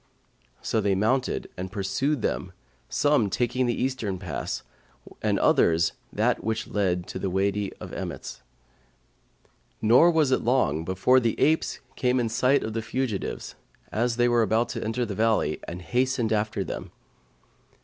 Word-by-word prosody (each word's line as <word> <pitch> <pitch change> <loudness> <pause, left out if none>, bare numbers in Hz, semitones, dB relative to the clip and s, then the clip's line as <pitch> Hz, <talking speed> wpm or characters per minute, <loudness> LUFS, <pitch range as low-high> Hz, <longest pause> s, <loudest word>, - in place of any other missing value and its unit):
So 110 - 0
they 100 -1 +2
mounted 115 +7 0
and 95 +1 -5
pursued 105 +8 -1
them, 95 0 -2 0.4
some 145 -8 +2
taking 125 +4 0
the 120 - -1
eastern 125 -7 -1
pass 90 -5 -4 0.6
and - - +1
others 85 0 +3 0.2
that - - +1
which 110 +1 -2
led 90 -4 0
to - - -5
the 95 - -1
Wady 100 +2 0
of - - -10
Emmets, - - -6 1.4
nor 120 +10 +6
was 160 -5 +3
it 130 - +3
long 120 -10 +1
before 95 +9 +3
the 115 -3 -1
apes 160 +2 +2
came 125 0 +1
in 120 -2 0
sight 125 +5 +2
of 110 - -4
the 115 - -2
fugitives, 110 -2 -3 0.4
as 120 +2 0
they 120 0 +4
were 120 -1 +3
about 110 +2 +1
to - - -4
enter 120 +2 -1
the 105 - -4
valley, 110 +2 +1
and 90 +1 -6
hastened 125 0 0
after 105 -2 0
them. - - -6
110 Hz, 155 wpm, -26 LUFS, 100-125 Hz, 1.4 s, nor